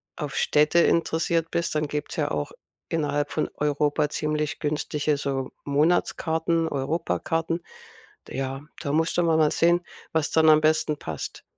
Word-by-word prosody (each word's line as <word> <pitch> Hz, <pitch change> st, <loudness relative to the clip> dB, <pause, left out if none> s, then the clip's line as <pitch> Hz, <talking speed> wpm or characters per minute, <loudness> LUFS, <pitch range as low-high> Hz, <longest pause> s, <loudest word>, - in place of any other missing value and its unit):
auf 145 Hz, -2 st, -5 dB
Städte 150 Hz, +4 st, +3 dB
interessiert 165 Hz, 0 st, +1 dB
bist, 170 Hz, -2 st, -1 dB
dann 150 Hz, -1 st, 0 dB
gibt's 150 Hz, 0 st, -4 dB
ja -, -, -1 dB
auch 75 Hz, -1 st, -2 dB, 0.4 s
innerhalb 145 Hz, -2 st, 0 dB
von 155 Hz, -, -1 dB
Europa 150 Hz, 0 st, +1 dB
ziemlich 150 Hz, 0 st, -2 dB
günstige 150 Hz, 0 st, -1 dB
so 135 Hz, -2 st, -3 dB
Monatskarten, 160 Hz, +2 st, +1 dB
Europakarten. 165 Hz, +3 st, -1 dB, 0.7 s
D -, -, -7 dB
ja, 135 Hz, +1 st, -3 dB, 0.2 s
da 140 Hz, -, -2 dB
musst 160 Hz, +2 st, +1 dB
du 175 Hz, -, +3 dB
mal 165 Hz, -1 st, +3 dB
mal 155 Hz, -1 st, +4 dB
sehen, 175 Hz, +1 st, +3 dB, 0.3 s
was 160 Hz, -2 st, +1 dB
dann 160 Hz, -1 st, +4 dB
am 155 Hz, 0 st, +7 dB
besten 155 Hz, -1 st, +2 dB
passt 80 Hz, -2 st, -6 dB
155 Hz, 150 wpm, -25 LUFS, 145-165 Hz, 0.7 s, am